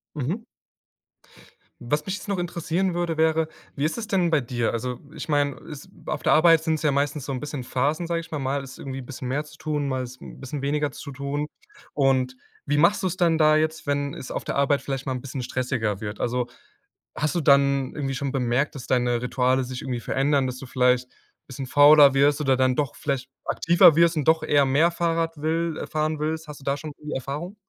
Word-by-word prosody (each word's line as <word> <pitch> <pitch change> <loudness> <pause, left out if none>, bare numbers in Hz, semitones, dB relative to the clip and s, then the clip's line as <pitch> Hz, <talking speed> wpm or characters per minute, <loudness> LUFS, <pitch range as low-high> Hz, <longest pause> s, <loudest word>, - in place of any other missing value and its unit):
Mhm. 155 - -2 1.4
Was 150 +5 -2
mich 190 - -2
jetzt 210 - -10
noch 200 -2 -1
interessieren 175 +1 -1
würde, 170 -2 -1
wäre, 160 0 +2 0.3
wie 140 - -2
ist 155 +9 -1
es 225 - -4
denn 185 -5 +1
bei 155 -3 +3
dir? 120 -2 -1
Also, 125 +1 -3
ich - - -7
meine, 145 -2 +1
ist 150 -4 -10 0.2
auf - - -3
der - - +3
Arbeit 165 0 +6
sind's 160 -2 -1
ja 150 - +2
meistens 140 0 -1
so 140 - -4
'n 130 - -3
bisschen 145 -3 -5
Phasen, 145 +7 -1
sage 170 0 -1
ich 165 - -12
mal. 155 - -3
Mal 135 +1 -1
ist 130 -2 -11
irgendwie 135 -1 -6
'n 125 - -10
bisschen 130 -2 -6
mehr 145 +4 -1
zu 155 0 -15
tun, 150 -2 -2
mal 130 -1 -1
ist 125 +1 -11
'n - - -11
bisschen 135 +1 -5
weniger 145 0 0
zu 140 - -8
tun. 140 +2 -3 0.5
Und 130 -2 +2 0.3
wie 145 - +1
machst 195 +6 +4
du's 185 -1 -1
denn 170 -3 +2
da 155 -1 +5
jetzt, 155 0 -1
wenn 145 0 -1
es 130 - -8
auf - - -4
der - - -3
Arbeit 140 0 +2
vielleicht 135 -1 -4
mal 130 - -1
'n 125 - -3
bisschen 135 -1 -5
stressiger 120 -5 -2
wird? 105 0 -6
Also, 125 0 0 0.7
hast 155 +3 -1
du 175 - +1
dann 140 -2 +3
irgendwie 135 -2 -3
schon 135 +1 -3
bemerkt, 130 +2 0
dass 130 - -8
deine 120 -2 +1
Rituale 130 +1 +1
sich 125 0 -6
irgendwie 125 -3 -3
verändern, 135 +3 +1
dass 125 0 -4
du 135 - -9
vielleicht 125 0 +2
'n - - -30 0.3
bisschen 135 0 -6
fauler 145 +1 +7
wirst 145 +2 +3
oder 135 -3 +2
dann 130 0 +2
doch 145 -4 -1
vielleicht 135 -3 -3 0.2
aktiver 170 -1 +5
wirst 170 0 +4
und 150 -1 -1
doch 160 0 +4
eher 145 -1 +3
mehr 145 +6 +3
Fahrrad 165 -1 -1
will 160 +2 -1
äh, - - -4
fahren 155 0 -1
willst? 160 +1 -2
Hast 145 -1 -9
du - - -15
da 140 0 0
schon 150 +1 -7
die 150 - -5
Erfahrung? 145 - -4
145 Hz, 230 wpm, -24 LUFS, 130-160 Hz, 1.4 s, fauler